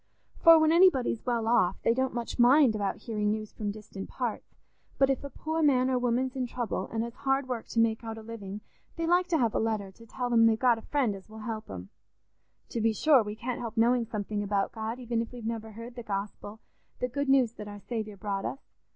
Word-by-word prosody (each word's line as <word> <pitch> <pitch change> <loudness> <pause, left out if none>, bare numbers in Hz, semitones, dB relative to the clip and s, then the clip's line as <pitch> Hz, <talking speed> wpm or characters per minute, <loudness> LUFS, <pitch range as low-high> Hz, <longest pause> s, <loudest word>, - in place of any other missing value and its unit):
For 330 -1 +8
when 315 0 +4
anybody's 330 -10 +4
well 235 -2 0
off, 225 -6 +3
they 230 - +4
don't 260 +1 0
much 240 +1 -4
mind 255 0 +6
about 200 -2 -1
hearing 210 -3 -1
news 215 0 -3
from 210 -2 -3
distant 205 -2 -8
parts; 245 -4 -4 0.4
but 270 0 +4
if 270 - -2
a 280 - -5
poor 315 +3 -3
man 260 -4 +3
or 255 - +2
woman's 250 +2 0
in 255 -2 -1
trouble 240 -1 -3
and 225 0 -1
has 235 0 -6
hard 270 +1 0
work 245 -3 -4
to 230 - -1
make 225 0 +2
out 225 -1 -5
a 220 - -9
living, 210 -3 -7 0.3
they 330 - -2
like 355 +2 +3
to 340 -3 +2
have 235 -6 +1
a - - +1
letter 215 -3 -1
to 230 +4 -17
tell 245 +2 -3
'em 230 -1 +6
they've 220 -1 +3
got 240 -1 +3
a - - -11
friend 255 -5 0
as 195 +2 -13
will 220 0 -10
help 220 -1 -5
'em. 95 0 -8 0.8
To 230 - -3
be 225 0 +2
sure, 280 +3 +5
we 210 -1 -5
can't 240 +2 -4
help 230 -1 -6
knowing 235 +1 +3
something 210 -1 -3
about 200 -1 0
God, 220 +1 -4
even 240 -2 -2
if 230 - -6
we've 245 -3 -9
never 225 -1 -4
heard 230 +3 -9
the 240 - -7
Gospel, 205 +1 -5 0.4
the 250 - 0
good 280 +3 -2
news 260 -4 +4
that 210 -3 -9
our 205 0 -8
Saviour 215 -2 -5
brought 200 -1 -3
us. 275 - -6
230 Hz, 235 wpm, -29 LUFS, 215-255 Hz, 0.8 s, For